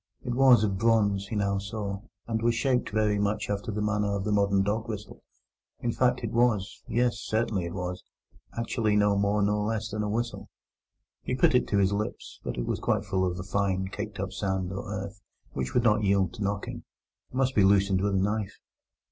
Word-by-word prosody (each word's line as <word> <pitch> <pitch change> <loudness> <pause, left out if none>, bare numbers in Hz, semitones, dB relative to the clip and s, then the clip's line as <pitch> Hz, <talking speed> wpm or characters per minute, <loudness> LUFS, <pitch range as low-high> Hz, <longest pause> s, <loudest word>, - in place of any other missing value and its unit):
It 125 - -1
was 125 -3 +6
of 100 -3 0
bronze, 100 -3 +2
he 110 - -4
now 100 -1 +1
saw, 100 -1 -4 0.2
and 110 -1 -2
was 115 0 +2
shaped 125 +1 +1
very 105 -1 +1
much 105 +1 -1
after 100 +2 -2
the 105 0 -2
manner 105 -1 0
of 100 - -2
the 105 - -1
modern 100 -1 +3
dog 110 +3 -1
whistle; 105 -2 -7 0.6
in 120 - -1
fact 125 +1 +1
it 115 - -2
was—yes, 120 +1 +1
certainly 110 -4 -1
it 85 - -5
was—actually 105 +4 -4
no 105 -1 +4
more 100 +1 +2
nor 105 +1 +1
less 110 -1 -2
than 105 +1 -2
a 105 - -1
whistle. 120 +3 -3 0.7
He 125 - -2
put 125 - +4
it 125 - +3
to 100 - +1
his 100 0 +3
lips, 105 +1 -4
but - - -4
it - - -2
was - - -2
quite 105 -1 0
full 95 -2 0
of 90 - -6
a 90 - -5
fine, 95 -1 0
caked 105 0 -6
up 95 0 -3
sand 95 -2 -2
or 100 +1 -5
earth, 100 0 -5 0.3
which 65 -1 -4
would 125 - +4
not 105 -2 +3
yield 100 -1 +2
to 115 - -9
knocking, 100 +1 -3 0.5
but 130 - -7
must 130 0 +2
be 105 - +4
loosened 95 -1 +4
with 100 0 +1
a - - +3
knife. 105 +1 -1
105 Hz, 205 wpm, -28 LUFS, 100-110 Hz, 0.7 s, was